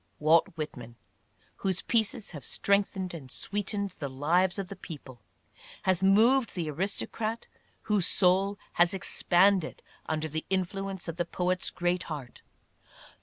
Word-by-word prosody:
Walt 160 Hz, +2 st, +5 dB
Whitman, 125 Hz, -7 st, -6 dB, 0.6 s
whose 190 Hz, -2 st, -1 dB
pieces 220 Hz, -2 st, 0 dB
have 150 Hz, -6 st, -8 dB
strengthened 195 Hz, +2 st, 0 dB
and 145 Hz, -6 st, -8 dB
sweetened 200 Hz, -, -3 dB
the 140 Hz, -, -3 dB
lives 170 Hz, +8 st, +2 dB
of 195 Hz, -2 st, -3 dB
the 200 Hz, -, -7 dB
people, 145 Hz, -9 st, -10 dB, 0.6 s
has 185 Hz, -1 st, +2 dB
moved 225 Hz, +6 st, +4 dB
the 165 Hz, -4 st, -2 dB
aristocrat, 210 Hz, +6 st, -2 dB, 0.4 s
whose 205 Hz, -4 st, +1 dB
soul 195 Hz, +2 st, +4 dB, 0.2 s
has 175 Hz, +3 st, +5 dB
expanded 185 Hz, -1 st, +2 dB, 0.2 s
under 155 Hz, 0 st, -1 dB
the 155 Hz, +1 st, -3 dB
influence 190 Hz, 0 st, -2 dB
of 165 Hz, 0 st, -5 dB
the 175 Hz, -, 0 dB
poet's 180 Hz, +1 st, -1 dB
great 175 Hz, 0 st, 0 dB
heart. 140 Hz, -6 st, -7 dB
180 Hz, 130 wpm, -29 LUFS, 160-195 Hz, 0.6 s, Walt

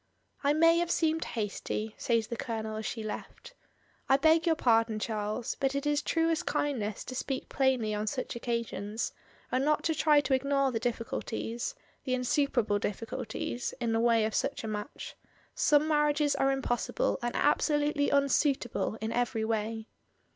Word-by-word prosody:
"I 285 Hz, +1 st, +4 dB
may 330 Hz, +2 st, +5 dB
have 345 Hz, -1 st, 0 dB
seemed. 320 Hz, -1 st, +1 dB
hasty," 215 Hz, 0 st, -3 dB
says 230 Hz, -2 st, +1 dB
the 235 Hz, -, -5 dB
Colonel 220 Hz, -3 st, -4 dB
as 220 Hz, -, -3 dB
she 225 Hz, -, -4 dB
left. 215 Hz, -, -7 dB, 0.6 s
"I 270 Hz, -, +6 dB
beg 320 Hz, +4 st, +4 dB
your 325 Hz, -, +4 dB
pardon, 225 Hz, -6 st, +3 dB
Charles; 215 Hz, +1 st, -2 dB
but 270 Hz, 0 st, 0 dB
it 280 Hz, +1 st, -2 dB
is 295 Hz, 0 st, +2 dB
truest 325 Hz, -1 st, 0 dB
kindness 220 Hz, -8 st, -1 dB
to 255 Hz, -, -7 dB
speak 260 Hz, +1 st, -3 dB
plainly 255 Hz, -5 st, +1 dB
on 210 Hz, +1 st, -2 dB
such 255 Hz, +2 st, -3 dB
occasions, 230 Hz, -3 st, -3 dB, 0.4 s
and 255 Hz, +1 st, +1 dB
not 300 Hz, +1 st, +2 dB
to 325 Hz, -, +1 dB
try 305 Hz, -1 st, +4 dB
to 275 Hz, -1 st, -1 dB
ignore 275 Hz, 0 st, +2 dB
the 225 Hz, -, -1 dB
difficulties 230 Hz, -, -3 dB
— -, -, -36 dB
the 255 Hz, -2 st, +1 dB
insuperable 250 Hz, -4 st, +1 dB
difficulties, 230 Hz, +3 st, -4 dB
in 235 Hz, -1 st, 0 dB
the 225 Hz, -, +2 dB
way 230 Hz, -1 st, +3 dB
of 220 Hz, -, -2 dB
such -, -, -1 dB
a -, -, -4 dB
match. 210 Hz, +4 st, -6 dB, 0.4 s
Some 305 Hz, -11 st, +3 dB
marriages 295 Hz, -1 st, +2 dB
are 270 Hz, -, +2 dB
impos 260 Hz, -3 st, -1 dB
sible -, -, 0 dB
and 240 Hz, 0 st, -2 dB
absolutely 295 Hz, 0 st, +2 dB
unsuitable 275 Hz, -5 st, +1 dB
in 220 Hz, +1 st, -2 dB
every 235 Hz, -2 st, 0 dB
way." 220 Hz, 0 st, -2 dB
250 Hz, 170 wpm, -30 LUFS, 225-290 Hz, 0.6 s, I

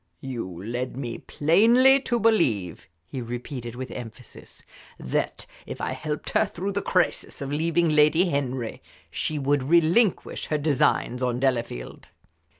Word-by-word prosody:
"You 125 Hz, -6 st, -4 dB, 0.2 s
led 120 Hz, +3 st, -4 dB
me 120 Hz, -4 st, -5 dB
plainly 235 Hz, -, +4 dB
to 240 Hz, -3 st, -1 dB
believe," 125 Hz, -, +1 dB, 0.2 s
he 130 Hz, +6 st, -5 dB
repeated, 120 Hz, 0 st, -6 dB
with 130 Hz, +1 st, -6 dB
emphasis, 120 Hz, 0 st, -10 dB, 0.4 s
"that 65 Hz, -, -2 dB, 0.2 s
if -, -, -7 dB
I -, -, -2 dB
helped 150 Hz, -1 st, -4 dB
her -, -, +3 dB
through 190 Hz, +3 st, -4 dB
the 200 Hz, +1 st, -1 dB
crisis 185 Hz, -, 0 dB
of 140 Hz, 0 st, -5 dB
leaving 165 Hz, +2 st, +1 dB
Lady 155 Hz, +4 st, +4 dB
Henry 130 Hz, -6 st, -2 dB, 0.3 s
she 155 Hz, -, -2 dB
would 145 Hz, 0 st, +1 dB
relinquish 170 Hz, -, +2 dB
her 150 Hz, -, 0 dB
designs 140 Hz, -4 st, +1 dB
on 125 Hz, -1 st, 0 dB
Delafield." 120 Hz, -, -2 dB
140 Hz, 140 wpm, -25 LUFS, 125-170 Hz, 0.4 s, plainly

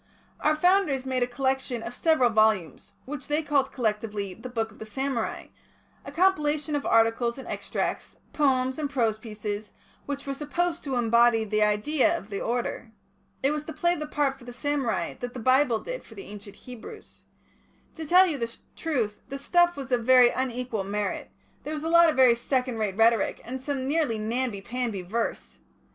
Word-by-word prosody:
Our 305 Hz, 0 st, +2 dB
Founders 330 Hz, -5 st, +2 dB
made 260 Hz, -1 st, -1 dB
a 245 Hz, -, +2 dB
collection 260 Hz, -2 st, -1 dB
of 235 Hz, -, -6 dB
several 310 Hz, -8 st, +3 dB
volumes, 215 Hz, -6 st, +1 dB
which 290 Hz, +1 st, -6 dB
they 300 Hz, +2 st, +1 dB
called, 280 Hz, -2 st, +1 dB
collectively, 210 Hz, -4 st, -2 dB
the 225 Hz, +7 st, -9 dB
Book 225 Hz, -2 st, -2 dB
of -, -, -18 dB
the 220 Hz, -, -7 dB
Samurai, 265 Hz, -1 st, -3 dB, 0.5 s
a -, -, -8 dB
compilation 305 Hz, -5 st, +1 dB
of 285 Hz, -, -2 dB
articles 230 Hz, +2 st, +3 dB
and 265 Hz, -, -9 dB
extracts, -, -, -3 dB, 0.2 s
poems 260 Hz, -2 st, +1 dB
and 295 Hz, -2 st, -1 dB
prose 230 Hz, -5 st, 0 dB
pieces, 210 Hz, -1 st, -6 dB, 0.3 s
which 280 Hz, -1 st, -4 dB
were 275 Hz, -, -2 dB
supposed 330 Hz, +4 st, -2 dB
to 270 Hz, -2 st, -2 dB
embody 235 Hz, -1 st, +4 dB
the 215 Hz, 0 st, 0 dB
idea 260 Hz, +10 st, +2 dB
of 210 Hz, -, -11 dB
the 200 Hz, -, -3 dB
order. 240 Hz, 0 st, -2 dB, 0.5 s
It 275 Hz, -, +3 dB
was 300 Hz, 0 st, -3 dB
to 320 Hz, -, -6 dB
play 345 Hz, 0 st, +2 dB
the 305 Hz, -1 st, -5 dB
part 285 Hz, -3 st, 0 dB
for -, -, -14 dB
the 245 Hz, 0 st, -9 dB
samurai 265 Hz, -, -1 dB
that 245 Hz, 0 st, -6 dB
the -, -, -4 dB
Bible 255 Hz, 0 st, +3 dB
did -, -, -6 dB
for -, -, -14 dB
the 390 Hz, -, -9 dB
ancient 205 Hz, -1 st, -10 dB
Hebrews. 250 Hz, -, -12 dB, 0.7 s
To 320 Hz, -, -7 dB
tell 360 Hz, +5 st, +6 dB
you 310 Hz, -6 st, -2 dB
the 230 Hz, 0 st, -4 dB, 0.2 s
truth, 235 Hz, -10 st, -2 dB
the 275 Hz, -, -4 dB
stuff 350 Hz, +4 st, +2 dB
was 270 Hz, -2 st, -7 dB
of 245 Hz, -2 st, +2 dB
very 250 Hz, 0 st, +6 dB
unequal 250 Hz, -4 st, -2 dB
merit; 205 Hz, +1 st, -3 dB, 0.3 s
there 305 Hz, -, -4 dB
was 300 Hz, -, -5 dB
a 325 Hz, -, -1 dB
lot 335 Hz, 0 st, +7 dB
of 310 Hz, -, 0 dB
very 255 Hz, -2 st, +6 dB
second 250 Hz, 0 st, -1 dB
rate 205 Hz, -3 st, -2 dB
rhetoric, 225 Hz, -1 st, +3 dB
and 260 Hz, +2 st, -5 dB
some 265 Hz, -1 st, -3 dB
nearly 290 Hz, -6 st, +1 dB
namby 225 Hz, -1 st, -2 dB
pamby 230 Hz, -3 st, -3 dB
verse. 225 Hz, +6 st, -3 dB
255 Hz, 185 wpm, -26 LUFS, 225-295 Hz, 0.7 s, lot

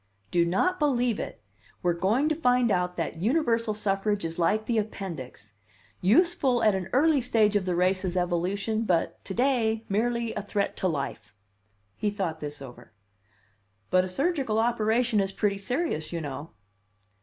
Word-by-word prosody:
"Do 170 Hz, -1 st, +3 dB
not 365 Hz, -, +1 dB
believe 250 Hz, -6 st, +1 dB
it! 110 Hz, -, -6 dB, 0.4 s
We 175 Hz, -, +3 dB
are -, -, 0 dB
going 210 Hz, -, +1 dB
to -, -, +2 dB
find 250 Hz, -6 st, +2 dB
out 180 Hz, -1 st, 0 dB
that 165 Hz, 0 st, -3 dB
universal 230 Hz, -, +1 dB
suffrage 205 Hz, -1 st, 0 dB
is 165 Hz, +1 st, -4 dB
like 215 Hz, +6 st, +2 dB
the 230 Hz, -2 st, +1 dB
appendix 160 Hz, -, -6 dB, 0.5 s
useful 260 Hz, -, +3 dB
at 215 Hz, -, +5 dB
an 190 Hz, -1 st, -3 dB
early 290 Hz, +1 st, +4 dB
stage 220 Hz, -4 st, +2 dB
of 200 Hz, -2 st, +1 dB
the 180 Hz, -1 st, 0 dB
race's 185 Hz, 0 st, +1 dB
evolution 190 Hz, +5 st, 0 dB
but 170 Hz, -4 st, 0 dB
to 190 Hz, -, -5 dB
day 230 Hz, -4 st, +1 dB
merely 235 Hz, +3 st, 0 dB
a 210 Hz, -, -3 dB
threat 200 Hz, 0 st, -2 dB
to 185 Hz, -, 0 dB
life." 140 Hz, -, -4 dB, 0.6 s
He 210 Hz, -, -1 dB
thought 185 Hz, -6 st, -3 dB
this 145 Hz, -2 st, -7 dB
over. 120 Hz, -3 st, -13 dB, 1.0 s
"But 185 Hz, 0 st, +4 dB
a 185 Hz, -, -4 dB
surgical 270 Hz, -, 0 dB
operation 225 Hz, 0 st, +2 dB
is 195 Hz, -1 st, 0 dB
pretty 200 Hz, 0 st, -1 dB
serious, 245 Hz, -, -2 dB
you 170 Hz, -, -2 dB
know." 145 Hz, 0 st, -6 dB
205 Hz, 165 wpm, -27 LUFS, 175-235 Hz, 1.0 s, at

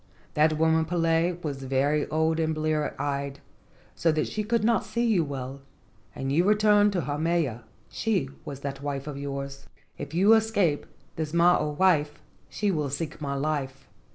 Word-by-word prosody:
That 155 Hz, +1 st, +3 dB
woman 160 Hz, 0 st, +3 dB
Pele 165 Hz, +1 st, +1 dB
was 140 Hz, -3 st, -4 dB
very 140 Hz, +3 st, +1 dB
old 160 Hz, +1 st, +1 dB
and 160 Hz, -1 st, 0 dB
blear 155 Hz, -1 st, -1 dB
eyed, 140 Hz, -1 st, -3 dB, 0.5 s
so 165 Hz, -, +2 dB
that 155 Hz, 0 st, 0 dB
she 215 Hz, -, -3 dB
could 230 Hz, +1 st, 0 dB
not 225 Hz, -2 st, +3 dB
see 235 Hz, +3 st, -1 dB
you 210 Hz, -8 st, +3 dB
well, 135 Hz, -1 st, -6 dB, 0.5 s
and 135 Hz, 0 st, -3 dB
you 165 Hz, +5 st, +3 dB
returned 210 Hz, 0 st, +4 dB
to 180 Hz, -, 0 dB
Haumea. 150 Hz, -6 st, -1 dB, 0.2 s
She 195 Hz, -11 st, -1 dB, 0.2 s
was 140 Hz, -1 st, -7 dB
that 140 Hz, -1 st, -5 dB
wife 140 Hz, -1 st, -3 dB
of 150 Hz, -2 st, -5 dB
yours. 140 Hz, -1 st, -6 dB, 0.3 s
If 145 Hz, +2 st, -6 dB
you 200 Hz, +5 st, +6 dB
escape 210 Hz, -9 st, +2 dB, 0.3 s
this 160 Hz, 0 st, -3 dB
mo 175 Hz, +1 st, +6 dB
o 150 Hz, -, -1 dB
wife 150 Hz, -2 st, +2 dB, 0.3 s
she 205 Hz, -1 st, 0 dB
will 150 Hz, -5 st, -1 dB
seek 155 Hz, +3 st, -5 dB
my 140 Hz, -1 st, -2 dB
life. 135 Hz, -2 st, -3 dB
155 Hz, 170 wpm, -27 LUFS, 140-175 Hz, 0.5 s, you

